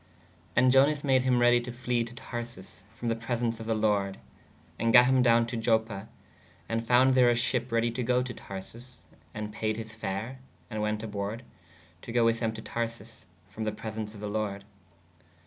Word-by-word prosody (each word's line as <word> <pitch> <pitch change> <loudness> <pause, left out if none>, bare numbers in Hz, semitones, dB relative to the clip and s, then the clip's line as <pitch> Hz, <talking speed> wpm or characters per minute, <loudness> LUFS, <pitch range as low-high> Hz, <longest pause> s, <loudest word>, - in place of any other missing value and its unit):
¶ - - -30 0.5
And 125 +1 +5
Ionas 140 +2 +4
made 130 -2 +3
hī 125 -1 +3
ready 120 0 +5
to 120 +1 -6
fle 120 -1 -1
to 115 +1 -10
Tharsis 120 -7 -8 0.2
frō 120 - -3
the 115 - +1
presens 115 0 -2
of 110 - -7
[the] 115 - +1
lorde/ 105 -3 +1 0.4
& - - -30
gatt 115 +2 +6
hym 130 0 +4
downe 115 -1 +4
to 120 +1 -5
Ioppe/ 110 -3 0 0.6
and 115 0 -2
founde 130 +2 +5
there 125 -1 +5
a 120 - +3
sheppe 120 0 0
ready 115 0 +2
to 120 +2 -3
goo 125 +1 +2
to 125 -1 -5
Tharsis/ 115 +6 -10 0.3
& 105 -1 -7
payed 110 0 -2
his 110 -1 -7
fare/ 110 +4 -4 0.2
& - - -31
wēt 105 0 -1
aborde/ 105 +1 -4 0.6
to - - -8
goo 120 -1 +3
with 115 0 +2
them 115 -2 0
to 110 0 -8
Tharsis 115 0 -5 0.3
frō 110 - -3
the 110 - 0
presens 110 0 -6
of 105 - -10
the 105 - -3
lorde. 105 -1 -3
115 Hz, 200 wpm, -29 LUFS, 110-120 Hz, 0.6 s, gatt